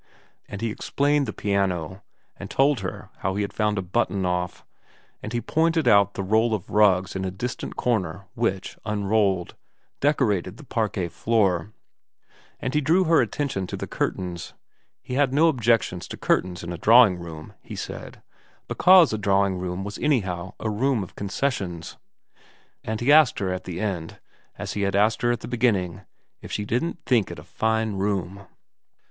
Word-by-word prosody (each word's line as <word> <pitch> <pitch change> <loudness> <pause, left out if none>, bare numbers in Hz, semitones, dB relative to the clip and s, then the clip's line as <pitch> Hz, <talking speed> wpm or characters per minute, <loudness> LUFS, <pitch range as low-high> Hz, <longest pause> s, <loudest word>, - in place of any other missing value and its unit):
And 100 - -6
he 115 -1 -1
explained 140 +4 0
the - - -2
piano, 95 -3 -1 0.3
and - - -9
told 140 -1 +3
her 95 -1 -6
how 95 +1 -2
he 105 - 0
had 100 - -5
found 105 -1 0
a 95 - -1
button 95 0 0
off, 90 0 -2 0.6
and 110 - -6
he 120 - -1
pointed 160 +5 +1
out 100 -1 +5
the 95 - -3
roll 110 +3 +2
of 100 -2 -8
rugs 95 -3 +3
in 95 - -2
a 95 - -1
distant 120 +6 -5
corner 95 -5 -1
which, 100 -5 -2
unrolled, 100 -3 0 0.5
decorated 110 - +1
the - - -12
parquet 105 -8 -1
floor, 100 -2 +1 0.9
and 130 - -3
he 150 - +2
drew 165 +7 +3
her 165 -1 +4
attention 130 -11 -2
to - - -5
the - - -4
curtains, 90 -2 -4 0.5
he - - -7
had 135 0 +2
no 160 +3 +5
objections 115 - +1
to - - -7
curtains 90 -1 0
in 85 +1 -5
a 85 - -7
drawing 110 -3 +6
room, 80 -2 -9
he - - -9
said, - - -7 0.4
because 180 -6 +6
a 110 - -2
drawing 100 -2 +2
room 90 +1 -4
was 100 0 -6
anyhow 95 - -1
a - - -3
room 115 +1 +1
of 90 - -11
concessions; 100 -5 -3 0.9
and 110 +1 -3
he 130 +4 +3
asked 150 -3 +6
her 95 -2 -1
at 90 - -6
the 90 -1 -5
end, 90 -6 -3 0.4
as - - -5
he 105 - -3
had 100 -1 0
asked 105 +2 +2
her 120 0 +2
at 120 - -2
the - - -7
beginning, 100 -7 0 0.4
if - - -10
she 105 - -2
didn't 125 +12 -1
think 115 -7 +2
it 85 - -7
a 75 - -10
fine 110 +5 -1
room. 100 -1 -2
100 Hz, 175 wpm, -24 LUFS, 95-120 Hz, 0.9 s, drawing